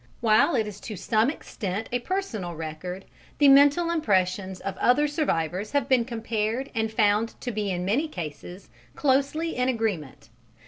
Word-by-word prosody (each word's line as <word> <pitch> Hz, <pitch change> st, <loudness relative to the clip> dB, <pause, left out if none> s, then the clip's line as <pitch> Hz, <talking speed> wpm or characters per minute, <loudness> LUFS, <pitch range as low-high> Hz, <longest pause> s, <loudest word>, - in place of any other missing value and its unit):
While 225 Hz, +7 st, +4 dB
it 225 Hz, -3 st, +1 dB
is 210 Hz, -1 st, -8 dB
to 215 Hz, -, -7 dB
some 220 Hz, +6 st, +1 dB
extent 210 Hz, -, -5 dB
a 245 Hz, -, 0 dB
personal 240 Hz, -, -3 dB
record, 165 Hz, +4 st, -6 dB, 0.3 s
the 290 Hz, -, +5 dB
mental 285 Hz, +5 st, +5 dB
impressions 190 Hz, -, 0 dB
of 195 Hz, -1 st, -4 dB
other 290 Hz, +5 st, +3 dB
survivors 205 Hz, -, -1 dB
have 285 Hz, -3 st, +1 dB
been 255 Hz, -4 st, +3 dB
compared 230 Hz, +1 st, -2 dB
and 220 Hz, -2 st, -1 dB
found 215 Hz, +1 st, +1 dB
to 245 Hz, -, -3 dB
be 210 Hz, -2 st, -2 dB
in 180 Hz, -1 st, -2 dB
many 255 Hz, +12 st, +1 dB
cases 175 Hz, -, -8 dB, 0.2 s
closely 280 Hz, +4 st, +1 dB
in 250 Hz, +1 st, +1 dB
agreement. 205 Hz, -, -3 dB
220 Hz, 155 wpm, -26 LUFS, 190-270 Hz, 0.3 s, the